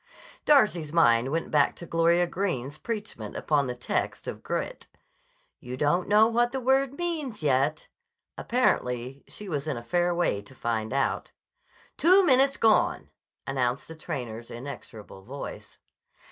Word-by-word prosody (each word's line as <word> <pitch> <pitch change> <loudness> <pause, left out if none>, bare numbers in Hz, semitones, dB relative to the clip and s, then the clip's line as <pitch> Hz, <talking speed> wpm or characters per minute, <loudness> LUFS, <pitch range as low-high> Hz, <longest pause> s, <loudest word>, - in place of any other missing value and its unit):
Darcy's 210 - +4
mind 125 -7 +4
went 165 +1 -2
back 145 -2 +3
to 170 - -9
Gloria 170 +1 +3
Greene's 155 -7 -3
preachment 210 - -5
upon 145 -3 +1
the 125 - -3
text 120 - -3
of - - -5
"grit": - - -4 0.7
"You 125 +1 -7
don't 175 +7 +1
know 210 +1 +6
what 240 +1 +1
the 265 - -2
word 265 +1 +2
means, 310 - -3
yet." 145 +2 +1 0.5
Apparently 130 - 0
she 210 - -7
was 150 -4 -3
in 145 -5 -2
a 120 - -7
fair 175 +7 +1
way 170 -12 0
to 105 +6 -16
find 110 -3 -2
out. 135 +1 -1 0.7
"Two 370 +3 +6
minutes 270 -1 +4
gone," 220 -1 +2 0.3
announced 130 +2 -1
the 160 - -8
trainer's 120 -7 -6
inexorable 120 -6 -9
voice. 135 +8 -8
155 Hz, 145 wpm, -27 LUFS, -, 0.7 s, know